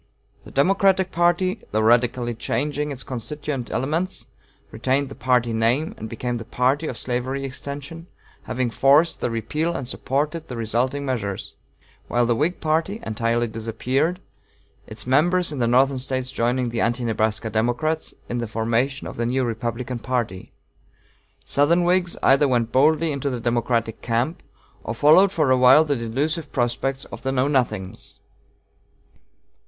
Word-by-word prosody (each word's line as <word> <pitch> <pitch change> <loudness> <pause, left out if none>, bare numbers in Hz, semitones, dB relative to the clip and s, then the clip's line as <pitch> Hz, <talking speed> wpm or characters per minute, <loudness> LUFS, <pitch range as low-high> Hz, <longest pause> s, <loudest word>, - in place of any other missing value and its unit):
The - - -10
Democratic 190 +4 +2
party, 175 +2 +1
though 110 - 0
radically 120 +1 +2
changing 145 +6 -2
its 135 -2 -6
constituent 135 +1 -5
elements, 160 +9 -2 0.5
retained 130 +4 0
the - - -8
party 125 -3 +1
name, 120 +8 +1
and 110 - -7
became 120 +2 -3
the - - -6
party 130 +7 0
of 120 - -5
slavery 130 +2 -2
extension, 140 +5 -7 0.4
having 125 -1 -1
forced 145 +7 +4
the - - -1
repeal 155 +9 -2
and 130 - -4
supported 150 +6 -2
the 125 - -6
resulting 125 +5 -1
measures; 105 -7 -3 0.5
while 120 0 +2
the 120 - +2
Whig 155 +8 0
party 160 +7 0
entirely 115 +2 0
disappeared, 125 +9 -1 0.7
its 110 - -7
members 165 +7 +3
in 145 - -5
the 120 - +2
Northern 130 +2 +3
States 130 0 -2
joining 125 0 0
the 115 0 -2
Anti 120 +2 0
Nebraska 110 0 -1
Democrats 120 +9 -1
in 120 - -3
the 115 - -3
formation 115 +6 -1
of - - -7
the 120 0 -1
new 130 +2 0
Republican 120 +1 -3
party. 115 -7 -3 0.9
Southern 165 +5 +3
Whigs 175 0 +1
either 140 +2 +5
went 120 -3 +1
boldly 155 +4 +3
into 140 0 -2
the 125 -2 -3
Democratic 115 -1 -1
camp, 120 +8 -1 0.4
or 110 - -4
followed 155 +10 +6
for 155 -7 +1
a 130 - +5
while 130 +5 +7
the 145 -2 0
delusive 145 +7 -2
prospects 130 +2 -1
of - - -10
the 135 - -1
Know 130 0 +1
Nothings. 110 -9 -2
130 Hz, 150 wpm, -23 LUFS, 120-150 Hz, 0.9 s, while